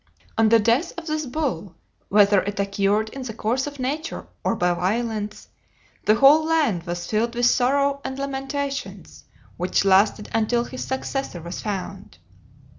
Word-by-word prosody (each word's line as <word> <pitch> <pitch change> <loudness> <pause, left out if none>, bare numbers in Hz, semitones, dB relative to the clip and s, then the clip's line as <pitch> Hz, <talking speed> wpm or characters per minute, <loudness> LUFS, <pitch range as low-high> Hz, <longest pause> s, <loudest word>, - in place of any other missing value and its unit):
On 225 -1 +4
the 230 - +6
death 230 +8 +1
of 345 - -6
this 310 -2 -2
bull, 245 - -3 0.3
whether 200 -1 +5
it 205 0 -5
occurred 200 +2 +1
in 270 - -8
the 235 -4 -6
course 245 +5 -1
of 290 -1 -7
nature 290 +5 -3 0.2
or - - +1
by 180 -3 +1
violence, 210 +3 -2 0.6
the 215 - +5
whole 280 +6 +6
land 310 - +1
was 175 0 -3
filled 230 +5 -1
with 240 0 +2
sorrow 280 +3 +2
and 265 0 -5
lamentations, 275 0 -5 0.3
which 180 +2 0
lasted 200 +2 +3
until 225 +2 +1
his 255 +1 -6
successor 265 -6 -3
was 170 +1 -6
found. 195 -1 -5
230 Hz, 155 wpm, -23 LUFS, 200-275 Hz, 0.6 s, the